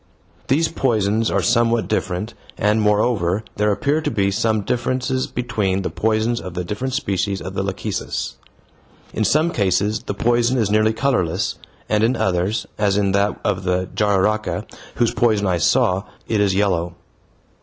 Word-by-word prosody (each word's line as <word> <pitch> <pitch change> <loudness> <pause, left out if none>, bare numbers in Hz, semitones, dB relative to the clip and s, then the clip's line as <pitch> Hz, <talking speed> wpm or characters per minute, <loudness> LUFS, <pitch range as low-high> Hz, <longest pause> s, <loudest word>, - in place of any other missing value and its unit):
These 160 +5 +2
poisons 110 -6 +1
are - - 0
somewhat 120 -1 +2
different 95 +5 -2 0.2
and 105 +1 +2
moreover 105 -2 +1
there 105 0 +2
appear 145 +9 0
to - - -1
be 100 -1 +1
some 110 +2 +1
differences 130 +4 -1
between 105 -6 -1
the - - -3
poisons 110 +2 0
of 90 -2 -8
the 90 - -2
different 115 +9 -3
species 100 -6 -1
of 95 +3 -7
lachecis; 95 0 -3 0.8
in 110 - 0
some 155 - +2
cases 100 - +1
the 100 - -5
poison 120 +4 +2
is 110 -4 +1
nearly 110 +1 +3
colorless, 110 -9 0 0.3
and 105 0 +1
in 120 +3 +3
others, 95 +1 0
as 100 -1 +2
in 100 -1 +2
that 100 +1 +1
of 100 -3 0
the 90 0 0
jararaca, 105 +1 +1 0.3
whose 120 -1 +1
poison 110 -4 +2
I 90 -3 +1
saw, 90 +5 +2 0.2
it 110 -2 +1
is 100 -2 +2
yellow. 90 -4 0
105 Hz, 155 wpm, -20 LUFS, 95-115 Hz, 0.8 s, nearly